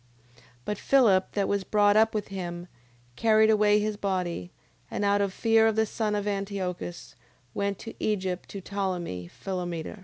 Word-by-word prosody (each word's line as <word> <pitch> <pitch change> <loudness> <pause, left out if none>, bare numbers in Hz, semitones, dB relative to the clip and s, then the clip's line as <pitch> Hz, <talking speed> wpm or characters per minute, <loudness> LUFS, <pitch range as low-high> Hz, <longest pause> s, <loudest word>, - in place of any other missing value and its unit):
9:29. 125 - -23 0.2
But 210 - -2
Philip, 215 -9 +4
that 200 -2 0
was 200 -1 0
brought 205 0 +3
up 220 +1 +4
with 210 - -2
him, 175 -2 -5 0.5
carried 220 - +4
away 210 -1 +4
his 210 0 -1
body: 180 - -2 0.4
and 205 - -2
out 200 0 +3
of 200 -1 0
fear 225 +2 +3
of 220 - +1
the 220 0 +3
son 215 -1 -2
of 205 0 -2
Antiochus, 195 -3 -4 0.4
went 200 +1 -2
into 225 - -7
Egypt 185 -4 -1
to 200 - -7
Ptolemee 180 - -3
Philometor. 175 - -5
200 Hz, 165 wpm, -27 LUFS, 185-210 Hz, 0.5 s, Philip